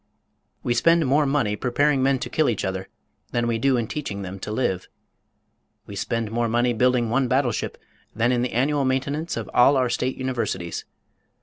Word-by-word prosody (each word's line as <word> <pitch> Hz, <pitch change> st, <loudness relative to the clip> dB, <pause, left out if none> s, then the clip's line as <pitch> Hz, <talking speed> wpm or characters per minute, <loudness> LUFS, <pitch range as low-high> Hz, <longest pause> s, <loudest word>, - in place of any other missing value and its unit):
We 120 Hz, -, +1 dB
spend 165 Hz, +7 st, +4 dB
more 145 Hz, +2 st, +3 dB
money 135 Hz, -7 st, +1 dB
preparing 135 Hz, +4 st, +1 dB
men 135 Hz, 0 st, +3 dB
to -, -, -3 dB
kill 155 Hz, -4 st, +2 dB
each 110 Hz, -, -1 dB
other 95 Hz, 0 st, -4 dB, 0.4 s
than 120 Hz, 0 st, +1 dB
we 115 Hz, -1 st, 0 dB
do 135 Hz, +1 st, +3 dB
in 115 Hz, -, 0 dB
teaching 105 Hz, -7 st, -5 dB
them 95 Hz, +1 st, -7 dB
to 105 Hz, -, -5 dB
live. 105 Hz, -6 st, -1 dB, 1.0 s
We 100 Hz, -, -9 dB
spend 115 Hz, +2 st, -2 dB
more 120 Hz, +1 st, 0 dB
money 120 Hz, +1 st, +2 dB
building 120 Hz, -1 st, +2 dB
one 130 Hz, +1 st, +2 dB
battleship 130 Hz, -3 st, 0 dB, 0.4 s
than 115 Hz, +3 st, +2 dB
in 120 Hz, -1 st, +1 dB
the 125 Hz, -, -2 dB
annual 140 Hz, +4 st, +1 dB
maintenance 140 Hz, +5 st, -1 dB
of -, -, -4 dB
all 135 Hz, +3 st, +5 dB
our 130 Hz, -1 st, +2 dB
state 125 Hz, +2 st, -1 dB
universities. 120 Hz, -9 st, -3 dB
125 Hz, 185 wpm, -24 LUFS, 115-135 Hz, 1.0 s, all